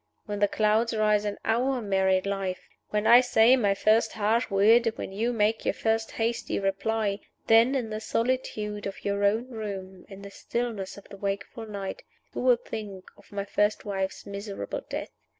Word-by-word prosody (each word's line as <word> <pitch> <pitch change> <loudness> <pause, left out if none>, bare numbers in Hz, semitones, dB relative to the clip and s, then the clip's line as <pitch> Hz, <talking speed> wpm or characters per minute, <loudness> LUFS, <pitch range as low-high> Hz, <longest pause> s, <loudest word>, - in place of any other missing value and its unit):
When 205 -2 -4
the 205 - +4
clouds 220 +3 +1
rise 210 -1 +2
in 205 -1 -2
our 250 +4 +1
married 190 -3 +1
life 195 -2 -3 0.2
when 210 0 -1
I 240 +2 +8
say 245 0 +5
my 205 -6 +2
first 215 +3 +3
harsh 225 +3 +1
word, 225 +4 +4
when - - -6
you 225 +5 -1
make 220 -1 +1
your - - 0
first 225 0 -1
hasty 230 +1 -1
reply 200 +1 -1 0.3
then, 230 +4 +5
in 235 -5 -2
the 215 - -3
solitude 215 -3 -2
of 195 - -8
your 200 0 0
own 220 +5 +2
room, 195 -5 -7
in 195 0 -11
the 200 - -9
stillness 225 -4 -4
of 200 - -13
the 200 - -10
wakeful 200 +4 -4
night, 200 -2 -5 0.3
you - - -3
will 250 -1 +5
think 210 -5 -8
of - - -21
my 200 -1 -3
first 205 +2 0
wife's 195 -2 -3
miserable 200 0 -5
death. - - -4
210 Hz, 180 wpm, -27 LUFS, 200-225 Hz, 0.3 s, I